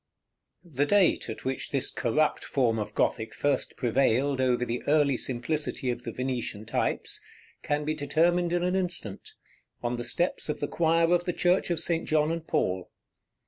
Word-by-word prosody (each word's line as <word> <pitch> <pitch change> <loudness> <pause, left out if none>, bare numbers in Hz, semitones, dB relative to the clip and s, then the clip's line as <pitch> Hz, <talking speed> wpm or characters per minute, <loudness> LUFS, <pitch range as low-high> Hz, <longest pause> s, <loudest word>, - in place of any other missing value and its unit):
The 145 -3 -1
date 200 -9 +3
at 110 - -7
which 130 0 -2
this 135 -1 -1
corrupt 150 +7 +1
form 120 -5 +1
of 105 - -5
Gothic 110 0 0
first 145 -2 -1
prevailed 130 +2 +2
over 125 -1 +2
the 120 0 -3
early 145 -2 +4
simplicity 130 +2 -2
of 120 0 -6
the 115 - -3
Venetian 125 -4 -3
types 115 - -1 0.4
can 150 0 -1
be 155 - 0
determined 165 +4 +1
in 175 0 +1
an 180 +1 +1
instant, 175 - -2 0.5
on 120 0 -1
the 120 - -3
steps 175 +4 -2
of 150 - -2
the 145 - -1
choir 165 +1 +2
of 175 0 +2
the 180 - -1
Church 180 +2 +2
of 170 -2 +1
St. 165 0 -1
John 155 0 +2
and 165 -1 -4
Paul. 90 -1 0
145 Hz, 175 wpm, -28 LUFS, 125-165 Hz, 0.5 s, early